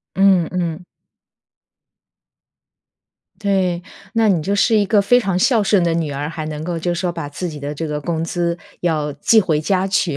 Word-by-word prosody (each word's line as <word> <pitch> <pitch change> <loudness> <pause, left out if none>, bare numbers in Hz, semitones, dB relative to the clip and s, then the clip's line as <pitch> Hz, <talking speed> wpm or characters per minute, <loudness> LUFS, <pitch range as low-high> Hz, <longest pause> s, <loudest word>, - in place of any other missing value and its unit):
嗯 190 -3 +4
嗯。 175 -1 -3 2.6
对， 190 -4 +1 0.3
那 225 -1 +3
你 180 -6 +2
就 200 +5 -1
是 220 +2 +3
一 210 - +3
个 205 +1 +3
非 245 +5 +4
常 195 -5 -1
孝 225 +3 +3
顺 205 -2 +3
的 170 -1 +1
女 165 -3 -1
儿， 145 +1 -3
还 160 -1 -5
能 155 -1 -5
够 175 0 -3
就 175 +2 -1
说 175 +1 -1
把 165 -4 -5
自 175 +5 -5
己 150 -3 -7
的 145 +1 -4
这 160 +2 -4
个 150 -1 -3
工 160 +1 -2
资 170 0 -1 0.2
要 155 -4 -1
寄 220 +10 +4
回 160 -6 0
家 185 +3 +1
去， 185 -6 0
175 Hz, 200 characters per minute, -19 LUFS, 155-195 Hz, 2.6 s, 嗯